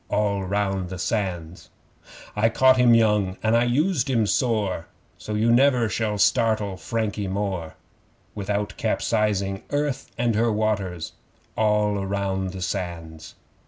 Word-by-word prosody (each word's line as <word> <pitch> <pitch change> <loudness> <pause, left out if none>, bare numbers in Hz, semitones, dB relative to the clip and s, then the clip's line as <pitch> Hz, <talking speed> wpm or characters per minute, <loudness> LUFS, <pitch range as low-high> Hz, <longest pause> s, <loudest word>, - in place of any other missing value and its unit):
(All 100 -1 0
round 95 -1 -1
the 95 - -6
Sands!) 90 -4 -3 0.7
'I 110 +2 +3
caught 130 +3 +4
him 120 -2 +6
young 105 -4 +2
and 110 +1 +3
I 120 +1 +3
used 145 +3 +1
him 115 -4 +2
sore, 105 -5 0 0.3
So 105 - -5
you 110 +2 +2
never 125 -1 +4
shall 110 -1 -1
startle 105 +1 +2
Frankie 105 +3 -3
more, 95 -4 -3 0.6
Without 100 0 -2
capsizing 100 -3 0
Earth 145 -2 -2
and 120 -1 +1
her 115 +2 +2
waters. 105 -6 -2 0.4
(All 105 -2 +1
round 95 -1 -2
the 95 -1 -6
Sands!) 85 -3 -5
105 Hz, 130 wpm, -24 LUFS, 95-115 Hz, 0.7 s, him